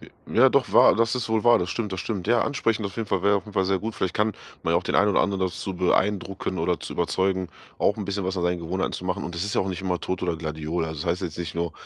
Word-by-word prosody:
J - - -14 0.2
ja 130 +3 +6
doch 140 -1 +1
wahr - - +7
das 115 +1 +2
ist 125 - -3
wohl 110 -1 +1
wahr. 120 - +6
Das 90 - -2
stimmt, 105 -3 -3
das 95 - -3
stimmt. 100 -4 -4
Ja, 120 0 +4
ansprechen 115 -6 0
auf 100 - -8
jeden 110 -3 -3
Fall 95 -2 0
wäre 100 +1 +4
auf 95 - -4
jeden 105 - -11
Fall 95 - +2
sehr 95 0 +2
gut. 110 0 -4
Vielleicht 95 -2 -1
kann 105 0 +1 0.3
man - - 0
ja - - +4
auch - - -7
den - - -2
einen 105 +1 +4
oder - - +3
anderen 95 -2 0
dazu 95 +1 -4
beeindrucken 95 0 0
oder 85 +1 0
zu - - -6
überzeugen, 95 -1 0 0.3
auch 105 - +2
'n 105 - -4
bisschen 100 -1 -2
was 95 +1 -2
an 90 - -1
seinen 90 0 0
Gewohnheiten 90 +3 -2
zu 90 - -5
machen. 90 -1 -2
Und 85 - -5
das 85 - -3
ist 105 - -3
ja - - +4
auch 95 - -1
nicht 95 0 -4
immer 90 -2 -1
Tod 95 -1 -3
oder 85 -2 0
Gladiole. 80 +1 -3
Also, 80 -2 -6
es - - -3
heißt 85 +2 0
jetzt 80 - -5
nicht 85 -2 -4
nur, 85 -1 -1
95 Hz, 315 wpm, -25 LUFS, 90-105 Hz, 0.3 s, wahr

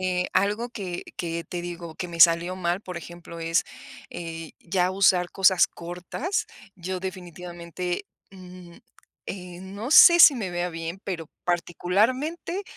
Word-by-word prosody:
Eh, 180 -1 0
algo 210 +5 +1
que 190 -7 -5
que 170 -1 -3
te 175 +2 -5
digo 170 -2 -7
que 180 - -4
me 170 -1 -6
salió 170 +2 +5
mal, 175 +1 -1
por 180 -4 -8
ejemplo, 170 0 -9
es, 165 +1 +1 0.5
eh, 165 -1 -7
ya 180 +1 0
usar 185 -2 +3
cosas 190 -2 +4
cortas. 180 - -4 0.3
Yo 185 +1 -4
definitivamente, 180 0 -6 0.2
mm, 180 -2 -13 0.5
eh, 180 -2 -7
no 200 +7 -7
sé 345 +2 +9
si 295 - +10
me 195 -6 -3
vea 175 0 -2
bien, 165 +2 -6
pero 165 -5 -5 0.2
particularmente 225 - 0
180 Hz, 140 wpm, -25 LUFS, 170-190 Hz, 0.5 s, si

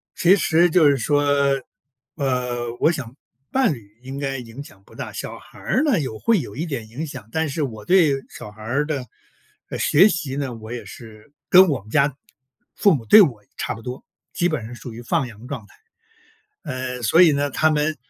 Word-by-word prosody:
其 175 +1 +5
实 175 -1 +3
就 160 -3 +5
是 140 - +2
说， 145 +4 +1 0.9
呃， 125 -4 -2
我 - - +4
想 130 -7 -6 0.4
伴 260 -9 +2
侣 110 -3 -14
应 135 +2 -7
该 135 -1 -2
影 125 +2 -9
响 100 -8 -17
不 - - -18
大。 - - -6
小 - - -6
孩 - - -16
儿 265 - 0
呢， 275 - +2
有 130 -7 -4
会 230 -3 +3
有 - - -7
一 155 +6 -3
点 135 -9 -5
影 130 +9 -5
响， 130 -8 -9
但 160 0 0
是 150 +2 -2
我 110 -6 -5
对 175 - +4 0.2
小 - - -10
孩 105 +1 -15
儿 135 +7 0
的， 145 -4 -3 0.6
呃， - - -4
学 180 +8 +5
习 155 -9 -2
呢， 135 -3 -3
我 110 0 -10
也 120 - -6
是 110 +3 -13 0.2
跟 185 +1 +8
我 140 - -1
们 105 - -17
家 140 +1 +2 0.6
父 200 - +4
母 120 -5 -6
对 215 - +9
我 120 - +1
差 - - -2
不 115 - -10
多， 125 +2 -7 0.3
基 175 - +1
本 155 -10 -3
上 115 - -9
属 120 -1 -9
于 115 - -9
放 125 +2 0
羊 110 0 -13
状 125 -7 -6
态。 - - -21 0.9
呃， 130 -1 -5
所 160 +9 +4
以 165 -4 +6
呢， 145 0 0
他 155 +4 +2
们 155 0 0
135 Hz, 225 characters per minute, -22 LUFS, 120-155 Hz, 0.9 s, 对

